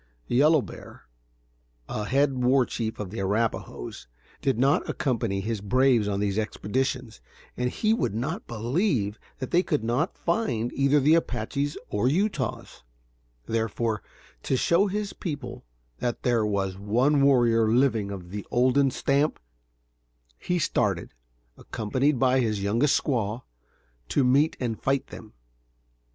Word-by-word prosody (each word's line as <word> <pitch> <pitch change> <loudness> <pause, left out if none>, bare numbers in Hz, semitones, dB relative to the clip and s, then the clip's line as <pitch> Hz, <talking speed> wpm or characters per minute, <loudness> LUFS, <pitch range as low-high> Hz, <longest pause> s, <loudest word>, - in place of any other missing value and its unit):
Yellow 145 - +4
Bear, - - -11 0.8
a 105 - -3
head 140 +4 +2
war 130 +1 +4
chief 110 -2 -4
of 100 -3 -5
the 110 - -5
Arrapahoes, 105 - -2 0.3
did 135 -4 +1
not 135 +4 +2
accompany 115 -7 -1
his 110 0 -3
braves 125 +1 +3
on 100 -1 -1
these 100 0 0
expeditions, 125 +2 -2 0.3
and 125 0 -1
he 215 - +1
would 165 - -1
not 135 +9 -3
believe 120 - -1 0.2
that 130 - -6
they 175 - +4
could 150 -9 -1
not 125 +9 -1
find 170 - -1
either 140 +2 +3
the 145 +3 +4
Apaches 145 -3 -1
or 105 +4 0
Utahs; 155 - -1 0.6
therefore, 115 -1 -1 0.4
to 130 - 0
show 170 +9 +3
his 205 +1 -3
people 145 - -6 0.3
that 120 -1 -3
there 120 -3 +2
was 95 -2 -2
one 125 +8 +2
warrior 120 -5 +4
living 115 -4 +2
of 90 -3 -8
the 105 0 -5
olden 130 +3 +3
stamp, 140 +3 0 1.0
he 180 - -1
started, 165 - 0 0.5
accompanied 130 +7 0
only - - -5
by 130 0 +3
his 110 -5 0
youngest 115 +8 +2
squaw, 115 -3 -2 0.7
to 140 - +2
meet 140 +5 +3
and 115 -4 -3
fight 135 0 +1
them. 110 - -11
125 Hz, 140 wpm, -26 LUFS, 110-140 Hz, 1.0 s, Yellow